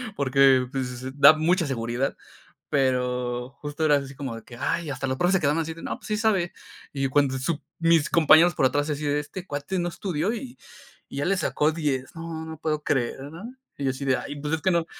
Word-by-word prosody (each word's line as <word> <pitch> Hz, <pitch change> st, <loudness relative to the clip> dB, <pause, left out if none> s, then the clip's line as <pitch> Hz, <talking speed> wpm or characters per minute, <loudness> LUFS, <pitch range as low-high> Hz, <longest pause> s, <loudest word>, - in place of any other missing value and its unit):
porque, 135 Hz, -3 st, +4 dB
pues 135 Hz, -2 st, -2 dB
s 130 Hz, +1 st, -6 dB
da 140 Hz, +1 st, +9 dB
mucha 165 Hz, +3 st, +1 dB
seguridad. 125 Hz, 0 st, -2 dB, 0.5 s
Pero 125 Hz, -2 st, 0 dB
justo 145 Hz, +1 st, -4 dB
era 150 Hz, -1 st, +5 dB
así 140 Hz, -1 st, -6 dB
como 135 Hz, -4 st, -5 dB
de 115 Hz, -, -10 dB
que: 120 Hz, -, -12 dB
"Ay, 160 Hz, +5 st, -1 dB
hasta 140 Hz, -1 st, -3 dB
los 130 Hz, 0 st, -2 dB
profes 175 Hz, +6 st, +2 dB
se -, -, +3 dB
quedaban 150 Hz, +1 st, +2 dB
así 160 Hz, 0 st, -4 dB
de, 165 Hz, -, -12 dB
no, -, -, -3 dB
pues, -, -, -13 dB
sí 215 Hz, -, 0 dB
sabe". 205 Hz, -6 st, +1 dB, 0.4 s
Y 135 Hz, -1 st, -1 dB
cuando 135 Hz, -1 st, +2 dB
sup 150 Hz, +3 st, -2 dB, 0.2 s
mis 165 Hz, -2 st, +3 dB
compañeros 165 Hz, +1 st, +6 dB
por 135 Hz, -, +2 dB
atrás 145 Hz, +3 st, +1 dB
así 150 Hz, 0 st, -3 dB
de: 145 Hz, 0 st, +1 dB
"Este 175 Hz, +5 st, -7 dB
cuate 145 Hz, +4 st, -4 dB
no 175 Hz, 0 st, -1 dB
estudió 180 Hz, +2 st, -2 dB
y 245 Hz, +1 st, -7 dB, 0.6 s
y -, -, -5 dB
ya 145 Hz, -, -1 dB
le 195 Hz, +2 st, +2 dB
sacó 155 Hz, -3 st, +1 dB
10 145 Hz, -5 st, -2 dB
no, 165 Hz, -1 st, -6 dB
no 160 Hz, -, -7 dB
lo 160 Hz, -, -8 dB
puedo 150 Hz, -1 st, -2 dB
creer, 125 Hz, -5 st, 0 dB
¿no? 170 Hz, -, -9 dB, 0.2 s
Y -, -, -5 dB
yo -, -, +2 dB
así 135 Hz, +1 st, -6 dB
de: 130 Hz, -1 st, +3 dB
"Ay, -, -, -6 dB
pues, 150 Hz, +1 st, -3 dB
es 160 Hz, -, -7 dB
que 185 Hz, -, +2 dB
no" 170 Hz, -2 st, +1 dB
145 Hz, 235 wpm, -25 LUFS, 135-165 Hz, 0.6 s, da